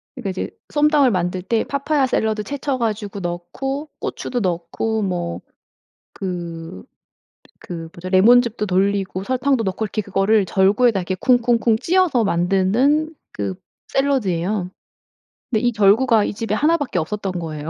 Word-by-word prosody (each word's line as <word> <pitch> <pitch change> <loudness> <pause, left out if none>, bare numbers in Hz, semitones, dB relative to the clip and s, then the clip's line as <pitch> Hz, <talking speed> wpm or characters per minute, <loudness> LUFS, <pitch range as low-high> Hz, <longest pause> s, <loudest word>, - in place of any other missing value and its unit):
그러니까 235 -8 -4
이제 185 - -4 0.2
쏨땀을 295 -3 +4
만들 180 -2 -1
때 220 +4 0
파파야 280 0 0
샐러드 220 -3 0
채쳐 280 +2 -3
가지고 210 -4 -3
넣고 270 - -4
고추도 245 - -3
넣고 185 +4 -2
뭐 175 -3 -2 0.7
그 170 - -6 0.8
그 165 -2 -7
뭐죠? 180 +2 -7
레몬즙도 225 +3 +4
돌리고 195 0 0
설탕도 255 +1 +1
넣고 195 +2 -2
이렇게 215 +1 -2
그거를 200 +1 +2
절구에다 200 +4 +3
이렇게 180 +1 -3
쿵쿵쿵 235 -1 +2
찧어서 340 -8 +2
만드는 200 - +2 0.2
그 100 -2 -3 0.4
샐러드예요. 200 -9 0 0.8
근데 220 -3 +1
이 245 0 +2
절구가 220 +2 +4
이 - - -3
집에 215 0 -2
1 320 +6 +3
밖에 280 - -3
없었던 195 +3 -3
거예요. 160 -3 -5
210 Hz, 310 characters per minute, -20 LUFS, 185-250 Hz, 0.8 s, 쏨땀을